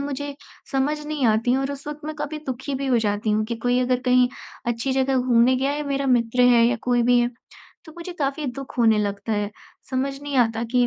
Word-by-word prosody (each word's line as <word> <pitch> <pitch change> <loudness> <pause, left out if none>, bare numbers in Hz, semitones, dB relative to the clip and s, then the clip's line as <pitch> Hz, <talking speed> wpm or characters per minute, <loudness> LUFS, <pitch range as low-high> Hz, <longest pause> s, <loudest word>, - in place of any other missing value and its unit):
मुझे 285 0 -4 0.4
समझ 275 +3 +1
नहीं 300 -4 -2
आती 225 +3 +2
और 270 +1 -1
उस 280 +1 -10
वक़्त 300 0 -6
मैं 310 0 -4
काफ़ी 300 +1 -4
दुखी 265 +2 -4
भी 275 +1 -3
हो 250 -3 +3
जाती 210 0 0
हूँ 215 +1 +1
कि 235 - -3
कोई 245 0 +3
अगर 250 0 +1
कहीं 250 0 +5 0.4
अच्छी 240 +3 -1
जगह 265 0 +1
घूमने 250 0 +4
गया 270 +2 0
है, 295 +1 -2
मेरा 275 0 -1
मित्र 245 -1 +2
है 235 -1 +5
या 245 - +1
कोई 245 -1 +2
भी 245 +1 +4
है 240 0 +1 0.5
तो 315 - -12
मुझे 345 +1 -7
काफ़ी 280 +1 -1
दुख 270 +1 -7
होने 225 -2 +4
लगता 205 +1 -2
है। 205 -1 -1 0.4
समझ 275 +1 -2
नहीं 285 -2 -3
आता 225 -2 +2
कि 245 -1 +4
255 Hz, 225 wpm, -23 LUFS, 235-275 Hz, 0.5 s, कहीं